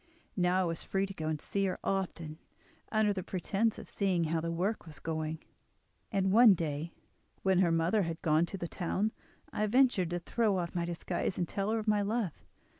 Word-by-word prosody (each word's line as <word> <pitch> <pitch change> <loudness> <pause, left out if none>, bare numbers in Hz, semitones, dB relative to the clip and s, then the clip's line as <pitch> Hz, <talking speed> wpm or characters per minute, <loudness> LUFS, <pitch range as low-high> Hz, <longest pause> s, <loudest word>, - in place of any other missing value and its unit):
Now 180 0 +2
I - - +2
was 165 -2 -2
free 195 0 0
to 195 - -7
go 160 -4 -4
and 155 -1 -1
see 195 +5 -1
her 185 - -1
often 170 -5 -2 0.5
under 215 -2 +3
the 190 - -3
pretence 195 +5 -1
of - - -9
seeing 190 -4 0
how 160 0 0
the 165 - -2
work 180 +3 -1
was 155 - -9
going 160 -1 -2
on, 160 - -17 0.7
and 195 -2 +1
one 225 -1 +8
day, 160 0 -3 0.5
when 190 -1 +3
her 175 -3 +4
mother 165 +6 +2
had 165 -2 -3
gone 160 +1 +3
to 195 - -6
the 175 - -4
town, 195 +5 -1 0.4
I 215 - 0
ventured 240 -6 +3
to 175 - -1
throw 205 +3 +1
off 170 -2 -3
my 170 -1 -1
disguise, 175 +1 -2
and 175 - 0
tell 200 +3 -2
her 225 - +1
of 220 0 -4
my 210 -1 +3
love. 205 -4 -1
185 Hz, 210 wpm, -32 LUFS, 165-205 Hz, 0.7 s, one